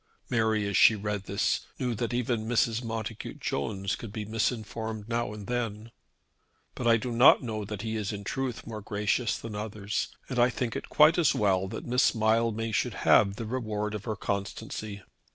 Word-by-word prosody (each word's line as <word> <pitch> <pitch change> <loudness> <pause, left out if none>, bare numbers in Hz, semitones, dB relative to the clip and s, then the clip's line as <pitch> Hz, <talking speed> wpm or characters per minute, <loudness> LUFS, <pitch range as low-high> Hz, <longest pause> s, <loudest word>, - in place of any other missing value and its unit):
Mary, 110 -3 +2
as 100 - -2
she 110 - +7
read 105 -1 -3
this, 100 - 0
knew 125 -2 -1
that 115 +2 -2
even 120 -2 -1
Mrs. 115 0 +1
Montacute 115 -1 -5
Jones 95 - -2
could 115 -3 -8
be 105 0 -4
misinformed 110 -1 -2
now 115 -2 -1
and 105 -1 -8
then. 115 -2 -3 0.8
"But 120 - -3
I 115 -1 +6
do 125 +2 -4
not 120 +3 +7
know 110 -3 -3
that 105 0 -5
he 110 0 -2
is 105 -1 -2
in 100 -1 -6
truth 130 +3 -3
more 110 -2 -6
gracious 105 +3 0
than 115 -2 -7
others, 105 0 -3 0.2
and 125 -2 -2
I 120 +1 +5
think 120 -2 -3
it - - -5
quite 155 +3 +6
as 160 - +4
well 95 -2 +2
that 110 - -6
Miss 125 +1 +3
Mildmay 115 0 +1
should 105 - 0
have 100 0 +5
the 115 - -5
reward 110 -3 -2
of 105 -1 -5
her 110 - -2
constancy." 100 0 -4
110 Hz, 190 wpm, -28 LUFS, 105-115 Hz, 0.8 s, she